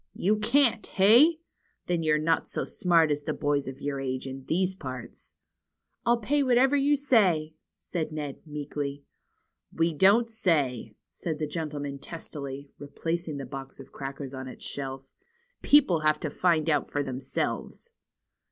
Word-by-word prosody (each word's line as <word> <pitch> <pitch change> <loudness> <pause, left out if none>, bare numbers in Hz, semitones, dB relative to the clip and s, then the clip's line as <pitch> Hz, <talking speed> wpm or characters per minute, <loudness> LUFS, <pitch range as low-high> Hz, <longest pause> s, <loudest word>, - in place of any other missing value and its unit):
^^You 210 +3 +1
can't, 235 -1 +3
hey? 235 - +6 0.5
Then 175 -2 0
you're 155 -1 +3
not 165 +2 +1
so - - -3
smart 170 -5 +3
as 145 0 0
the 145 - -3
boys 145 -2 0
of 135 0 -7
your 140 -1 -2
age 130 -1 -3
in 135 0 -7
these 185 +3 +1
parts." 130 -9 -9 0.7
I'll 240 0 +5
pay 280 +6 +1
whatever 260 +1 +4
you 285 +1 +3
say," 190 - +2 0.2
said 160 -3 -4
Ned, 150 -3 -5
meekly. 145 -1 -5 0.7
^^We 165 0 +1
don't 200 +9 +5
say," 145 - 0 0.2
said 160 -3 -4
the 155 - -1
old 150 - -10
gentleman 145 -4 -4
testily, 140 -4 -7
re 145 - -8
placing 165 +1 -3
the 135 - -5
box 135 +1 -8
of - - -12
crackers 135 0 -6
on 130 0 -6
its 130 - -10
shelf. 135 -1 -6 0.5
People 265 - +5
have 155 0 +2
to 155 - -3
find 165 -3 +2
out 150 -2 +1
for 145 - -1
themselves." 135 - -4
155 Hz, 160 wpm, -28 LUFS, 140-190 Hz, 0.7 s, hey